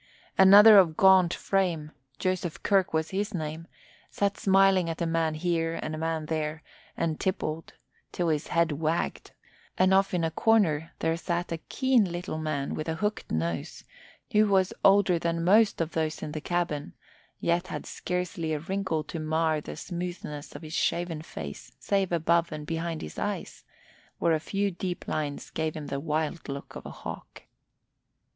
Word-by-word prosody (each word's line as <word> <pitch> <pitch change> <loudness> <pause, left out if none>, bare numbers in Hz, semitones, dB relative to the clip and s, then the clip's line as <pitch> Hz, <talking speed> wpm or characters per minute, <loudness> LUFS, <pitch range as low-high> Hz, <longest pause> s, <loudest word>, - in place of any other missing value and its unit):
Another 205 +2 +9
of 165 -5 +3
gaunt 190 -2 +6
frame, 175 -7 -1 0.3
Joseph 185 -1 -2
Kirk 195 -3 +2
by 160 0 +1 0.3
name, 160 0 -5 0.4
sat 200 0 0
smiling 195 -2 +4
at 165 - -4
a 170 - 0
man 165 -1 0
here 165 0 0
and 155 - -4
a - - -4
man 160 -1 -2
there 155 0 -3 0.3
and 160 -2 -1
tippled 165 -4 -3 0.4
till 175 -2 -1
his 155 -1 -1
head 170 -1 +2
wagged; 160 +3 -2 0.5
and 185 +1 +4
off 195 0 +3
in 170 - 0
a 165 - 0
corner 165 -8 +2
there 160 - +1
sat 175 +1 -2
a 165 - -2
keen 255 -8 +2
little 175 -2 -4
man 155 -3 -2
with 155 +1 -4
a 160 - -1
hooked 210 +4 -2
nose, 80 +1 -3 0.5
who 215 0 +4
was 190 -2 +2
older 195 -3 +5
than 165 0 -1
most 210 +4 +4
of 165 -1 -1
those 160 -1 -2
in 150 - -4
the 155 0 -5
cabin 165 - -2 0.5
yet 175 +2 0
had - - -5
scarcely 180 -3 -3
a 150 - -1
wrinkle 185 -1 -2
to 165 - -6
mar 155 0 0
the - - -8
smoothness 175 -5 -6
of - - -8
his 155 0 -8
shaven 170 -2 -1
face 70 - -8
save 195 -2 0
above 170 0 +2
and 155 -1 -6
behind 165 0 -3
his 75 - -7
eyes, - - -4 0.5
where 165 - +2
a 155 - +2
few 200 +5 -1
deep 175 0 -5
lines 145 -2 -3
gave 160 -1 -2
him 155 -2 -6
the 140 - -3
wild 155 +2 -2
look 140 0 -7
of - - -8
a - - -6
hawk. - - -9
165 Hz, 170 wpm, -28 LUFS, 155-185 Hz, 0.5 s, Another